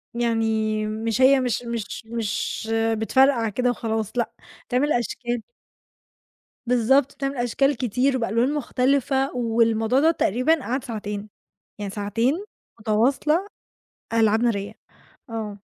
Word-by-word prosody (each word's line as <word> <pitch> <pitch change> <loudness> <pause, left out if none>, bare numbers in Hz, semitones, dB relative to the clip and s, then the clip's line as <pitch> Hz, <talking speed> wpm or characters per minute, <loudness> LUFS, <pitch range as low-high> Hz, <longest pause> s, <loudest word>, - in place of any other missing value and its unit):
يعني 220 -2 0
مش 220 +2 -2
هي 270 +1 +6
مش 245 -2 -1
مش 235 -1 -5
مش 225 0 -3 0.2
بتفرقع 235 +1 +3
كده 245 +4 0
وخلاص 220 -3 -2
لأ، 240 - 0 0.4
بتعمل 265 +4 +1
أشكال. 240 0 -2 1.2
بالضبط، 250 +3 +3
بتعمل 275 0 -3
أشكال 275 +4 +1
كتير 255 +3 +1
وبألوان 235 +4 +1
مختلفة 270 0 +1
والموضوع 230 0 +2
دَوّة 320 +3 +5
تقريبًا 290 +3 +1
قعد 255 +2 -2
ساعتين، 210 -2 -5 0.5
يعني 205 -1 -4
ساعتين 230 - -1 0.4
متواصلة 265 - +1 0.7
ألعاب 220 -1 +3
نارية. 205 -4 -1 0.6
آه. 215 -3 -5
235 Hz, 110 wpm, -23 LUFS, 220-265 Hz, 1.2 s, هي